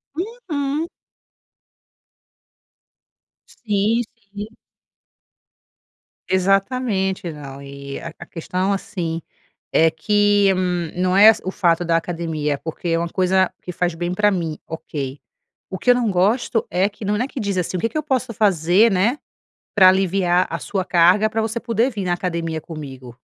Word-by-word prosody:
Uhum. 325 - -3 2.6
Sim, 215 +1 0 0.3
sim. 205 +1 -5 1.8
Exatamente, 195 -1 +1
não 140 -2 -9
e 140 0 -8
a - - -8
a 175 - -8
questão, 185 +3 -2
assim, 170 -4 -3 0.5
é 160 0 +5
que 205 +3 +3 0.4
não 180 +1 +1
é 210 +3 +9
as 225 - +3
o 185 - -3
fato 175 -2 +2
da 165 0 +3
academia, 160 -4 -2
porque 165 +3 -5
é 165 - +2
uma 170 0 -2
coisa 185 0 +2
que 180 - -6
faz 175 -1 -1
bem 175 +1 -2
para 210 +2 +3
mim, 165 -5 -2
ok. 145 -4 -5 0.5
O 190 - -4
que - - -1
eu 245 - +7
não 235 -4 +1
gosto 215 +5 +1
é 185 +4 +1
que 205 0 -9
não 210 +1 +1
não 245 - 0
é - - -6
que 275 - -7
diz 200 -4 -2
assim: 180 +1 -1
"O - - -3
que 230 - 0
que 310 - -5
eu 305 - -1
posso 255 -5 -1
fazer, 195 +2 +3
né, 205 +9 +2 0.6
pra 190 -3 +8
aliviar 185 -1 +2
a - - -3
sua 190 -3 -2
carga 180 +5 +4
pra 225 +1 -1
você 225 +1 -2
poder 230 +1 +1
vir 205 -5 -4
na 175 - +1
academia 165 -3 -3
comigo?" 135 -6 -9
185 Hz, 155 wpm, -21 LUFS, 170-215 Hz, 2.6 s, é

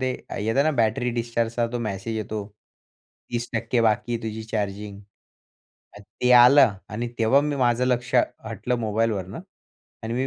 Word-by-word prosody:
ते 130 0 0 0.2
अ, - - -5
येत 110 +3 -1
ना 155 - +3
बॅटरी 120 0 +1
डिस्चार्जचा 115 0 -1
तो 120 - -2
मॅसेज 110 0 -4
येतो 105 -1 -4 0.8
30% 120 0 -1
बाकी 115 +1 +1
आहे 115 - -4
तुझी 110 0 -5
चार्जिंग 105 -2 -4 1.0
ते 125 +4 -3
आलं 125 0 +7 0.2
आणि 120 +3 -3
तेव्हा 115 +5 +4
मी 145 0 -2
माझं 125 -1 +2
लक्ष 125 0 -1 0.3
हटलं 115 +3 -3
मोबाईलवरनं 110 -4 -2 0.6
आणि 115 +1 -3
मी 130 +2 0
115 Hz, 145 wpm, -24 LUFS, 110-125 Hz, 1.0 s, आलं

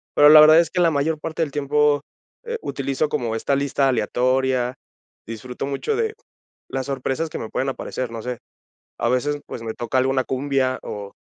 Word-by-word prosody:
Pero, 145 0 +7
la 155 0 +10
verdad 155 +2 +8
es 170 - +1
que 180 - 0
la 170 - +5
mayor 155 +1 0
parte 165 +1 -2
del 150 - -4
tiempo, 145 0 +2 0.4
eh, 470 0 -4
utilizo 140 +2 -1
como 115 -5 -2
esta 140 +5 0
lista 140 0 +1
aleatoria, 125 +1 +1 0.5
disfruto 120 +4 -6
mucho 140 - -2
de 445 0 -1 0.5
las 135 -1 -3
sorpresas 135 +3 -2
que - - -5
me 110 - -6
pueden 135 - -1
aparecer, 130 -2 -4
no 115 -1 -6
sé, 125 -1 -4 0.6
a 120 - 0
veces, 145 +4 0
pues, 115 - -7
me 110 -1 -5
toca 120 +2 -2
alguna 130 0 +1
cumbia, 130 -1 0
o 100 -1 -7
135 Hz, 185 wpm, -22 LUFS, 125-150 Hz, 0.6 s, la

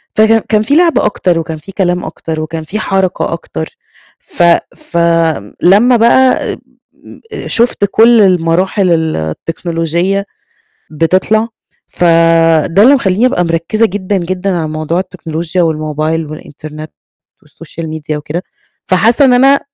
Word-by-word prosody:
فكان 220 +1 +4
كان 215 -1 +2
في 275 +7 0
لعب 340 0 +3
أكتر، 180 -4 0
وكان 160 -1 -5
في 175 +6 -12
كلام 180 -2 -1
أكتر، 160 0 -5
وكان 160 +1 -5
في 205 +7 -5
حركة 190 -3 -1
أكتر، - - -6 0.5
ف 175 - -3 0.3
فلمّا 170 - +1
بقى 255 +3 +3
أ - - -9 0.8
أ - - -6
شفت 235 -3 +1
كلّ 230 0 +5
المراحل 185 +1 +1
ال 160 -1 0
التكنولوجية 165 - -2 0.7
بتطلَع، 185 +8 +1 0.4
فده 165 +1 +3
اللي 275 +4 +6
مخلّيني 205 -1 +1
أبقى 180 -8 +1
مركّزة 165 +7 0
جدًا، 195 +1 -2
جدًا 185 +2 -3
على 160 -2 -2
موضوع 155 +2 -2
التكنولوجيا 165 -1 -4
والموبايل 155 0 -1
والإنترنت 155 0 -10 0.5
والsocial 165 - -10
media 155 -1 -5
وكده، 150 +4 -5 0.4
فحاسّة 225 +9 +3
إن 255 - +4
أنا 270 +3 +4
175 Hz, 130 wpm, -12 LUFS, 160-205 Hz, 0.8 s, اللي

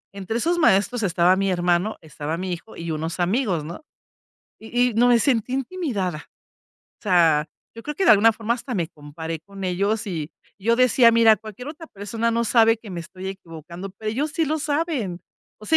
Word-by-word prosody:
Entre 200 +4 -3
esos 345 +8 +1
maestros 225 - +3
estaba 180 0 +3
mi 195 0 0
hermano, 175 +3 +1
estaba 155 +1 -5
mi 185 0 -3
hijo 175 +6 -9
y 170 0 -6
unos 160 +3 -3
amigos, 185 - 0
¿no? 170 - -8 0.8
Y 245 +2 +1
y - - -10
no 240 +3 +4
me 240 -1 +6
sentí 250 0 +1
intimidada. 245 - -3 0.8
O - - -30
sea, 165 -6 +3 0.3
yo 230 - -10
creo 295 - -5
que 390 - 0
de - - +6
alguna 220 +2 +6
forma 225 +1 -1
hasta 250 0 -6
me 170 -4 0
comparé 160 +1 -7
con 195 +3 -9
ellos 200 +5 0
y 165 -5 -4 0.3
yo 230 +4 +1
decía: 255 -1 +5
"Mira, 225 -1 +6
cualquier 220 +6 -9
otra 325 +2 -9
persona 225 +1 -3
no 235 +1 0
sabe 225 0 +4
que 215 -2 -12
me 175 -2 -5
estoy 185 +3 -8
equivocando, 175 0 -9
pero 215 -1 -3
ellos 285 +7 -2
sí 325 0 +1
lo 310 +2 -1
saben". 290 - -2 0.4
O 215 - -13
sea, 320 - +4
210 Hz, 200 wpm, -23 LUFS, 175-240 Hz, 0.8 s, me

